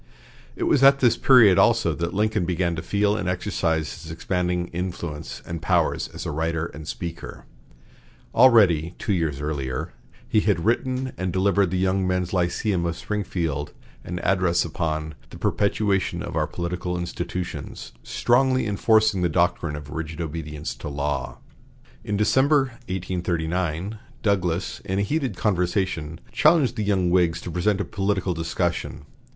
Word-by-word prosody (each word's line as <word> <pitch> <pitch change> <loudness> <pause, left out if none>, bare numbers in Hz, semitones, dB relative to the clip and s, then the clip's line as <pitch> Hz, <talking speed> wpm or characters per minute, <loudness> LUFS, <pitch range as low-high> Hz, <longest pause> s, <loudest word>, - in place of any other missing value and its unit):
It - - -3
was 135 - +3
at 140 0 +7
this 120 -3 +4
period 115 -8 +6
also - - +4
that 85 0 -3
Lincoln 105 0 +1
began 85 -1 0
to 80 - -4
feel 105 +3 +1
and 90 - -2
exercise 85 -4 -1
his 80 - -10
expanding 90 +1 -1
influence 85 -4 -5
and 85 -1 -5
powers - - +1
as - - -8
a - - -2
writer 80 +1 -1
and 80 -1 -9
speaker. 85 -1 -6 0.9
Already, 100 -10 +5
two 105 - -1
years 80 -6 -1
earlier, 70 -4 -3 0.3
he 110 - +3
had 100 -5 +1
written 130 +3 0
and 95 -1 -1
delivered 100 +2 +2
before 95 - -1
the 90 - +1
Young 95 0 +1
Men's 90 -1 -1
Lyceum 90 +1 0
of 85 0 -3
Springfield 85 -8 -3 0.3
an 90 - -5
able - - -3
address 90 -3 +2
upon 80 -1 -3 0.2
"The - - -10
Perpetuation 100 -2 0
of - - -6
Our - - +1
Political 90 +1 -3
Institutions," 85 +1 -5
strongly 130 - +2
enforcing 110 -1 +3
the 90 - +2
doctrine 85 -2 +1
of 75 -1 -8
rigid 80 0 -5
obedience 75 -2 -4
to - - -6
law. 70 -3 -3 0.7
In 105 -2 -2
December, 135 +7 +4 0.3
1839, 90 +1 -2 0.2
Douglas, 95 -4 0
in 95 - -2
a 100 - +2
heated 140 +3 -1
conversation, 90 -5 -1
challenged 150 -5 +4
the 110 - -2
young 95 -4 +1
Whigs 85 -2 +2
present 90 +4 0
to 100 - -1
a - - -10
political 95 -2 -1
discussion. 80 -1 -2
90 Hz, 155 wpm, -24 LUFS, 85-105 Hz, 0.9 s, at